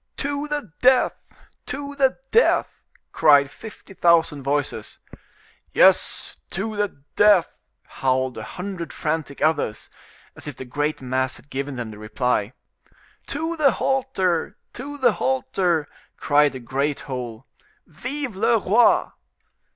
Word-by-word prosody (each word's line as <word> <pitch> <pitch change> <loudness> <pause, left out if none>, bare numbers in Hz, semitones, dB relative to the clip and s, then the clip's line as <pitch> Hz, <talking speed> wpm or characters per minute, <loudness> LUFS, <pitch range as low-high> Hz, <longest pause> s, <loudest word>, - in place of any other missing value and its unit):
"To 285 +1 -2
the 295 - -4
death! 255 0 +5 0.5
to 285 0 -4
the 270 -2 +2
death!" 465 - +2 0.3
cried 145 -2 +5
fifty 215 0 -12
thousand 165 -5 +3
voices. 135 -5 -2 0.8
"Yes; - - +3
to 215 +4 -3
the 205 -9 -3
death!" 205 -5 +4 0.3
howled 130 -1 -1
a - - -6
hundred 180 -2 -6
frantic 150 -2 -3
others, 155 -9 0 0.4
as - - -8
if 145 - -6
the 130 - -8
great 145 +3 -2
mass 130 0 -1
had 145 - -17
given 140 +1 -3
them 120 -3 -5
the 105 - -11
reply. 110 0 -1 0.8
"To 325 +4 -2
the 290 -4 +4
halter! 250 -11 0 0.2
to 285 +4 -7
the 255 -4 +4
halter!" 160 +2 0 0.3
cried 145 -1 +3
the 130 - -6
great 135 +4 -2
whole; 125 -3 -6 0.4
"Vive 255 - -5
le 220 +4 +3
roi!" 220 +4 +3
160 Hz, 130 wpm, -23 LUFS, -, 0.8 s, death